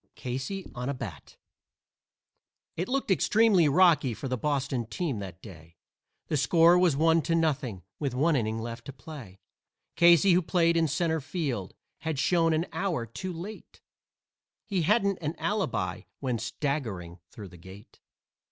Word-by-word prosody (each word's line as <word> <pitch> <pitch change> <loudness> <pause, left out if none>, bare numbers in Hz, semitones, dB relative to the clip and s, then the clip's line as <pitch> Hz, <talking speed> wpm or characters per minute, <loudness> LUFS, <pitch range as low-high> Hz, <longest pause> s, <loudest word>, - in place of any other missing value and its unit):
CASEY 130 +10 -4
ON 125 +2 -4
A 140 - -2
BAT - - -9 1.4
It 175 +3 -3
looked 265 -5 -1
extremely 195 -3 +4
rocky 150 -6 +4
for 115 - -5
the 130 - -1
Boston 135 -2 -1
team 135 - -3
that 95 -2 -9
day, 85 -4 -13 0.5
The 150 - -1
score 165 +5 +5
was 175 -5 +3
one 165 +2 +3
to 165 +1 0
nothing, 135 - -1 0.2
with 140 -4 -2
one 155 +4 +2
inning 110 -3 -1
left 115 +1 -6
to 140 - -8
play. 120 - -11 0.5
Casey, 170 +2 +6
who 180 - +4
played 170 0 +2
in 165 -1 +3
centre 160 +2 0
field, 135 - -4 0.2
had 160 -2 -3
shown 165 +3 +2
an 160 +2 +1
hour 175 -12 -1
too 185 - -6
late 180 +6 -9 0.9
He 195 -5 -1
hadn't 200 +2 +2
any 155 +1 -3
alibi 110 - -2 0.2
when 125 -4 -2
staggering 110 - -3
through 100 -4 -10
the 90 - -14
gate. 95 +5 -14
145 Hz, 150 wpm, -28 LUFS, 115-170 Hz, 1.4 s, Casey